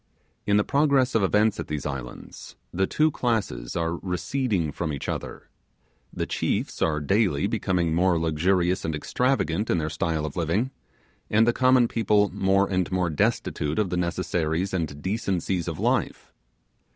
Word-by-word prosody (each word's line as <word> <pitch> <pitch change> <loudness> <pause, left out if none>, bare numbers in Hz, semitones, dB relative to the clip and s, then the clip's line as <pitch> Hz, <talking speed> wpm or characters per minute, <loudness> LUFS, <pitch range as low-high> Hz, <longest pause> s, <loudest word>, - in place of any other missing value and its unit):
In 100 0 +4
the 105 - +3
progress 140 -2 +2
of 115 - +3
events 105 +2 +2
at - - -4
these 75 -1 -4
islands, 65 -4 -7 0.2
the 95 +2 +1
two 155 +1 +2
classes 105 - -2
are 85 0 -1
receding 95 - -1
from 80 +1 -3
each 70 - -5
other; - - -5 0.6
the - - -3
chiefs - - -2
are 75 -2 +1
daily 95 0 +1
becoming 85 -3 0
more 90 0 +2
luxurious 90 +3 +1
and 80 -1 -2
extravagant 105 - 0
in - - +2
their 80 -1 -2
style 80 -2 -1
of 75 - -6
living, 90 +10 0 0.6
and 110 +2 +4
the 120 - +3
common 130 -1 +4
people 105 -3 +2
more 95 +1 +2
and 95 -1 -1
more 90 -2 0
destitute 75 0 -1
of 105 -4 0
the - - 0
necessaries 85 0 -1
and 75 -5 -3
decencies 95 -4 -1
of - - -3
life. - - -1
90 Hz, 160 wpm, -25 LUFS, 80-105 Hz, 0.6 s, In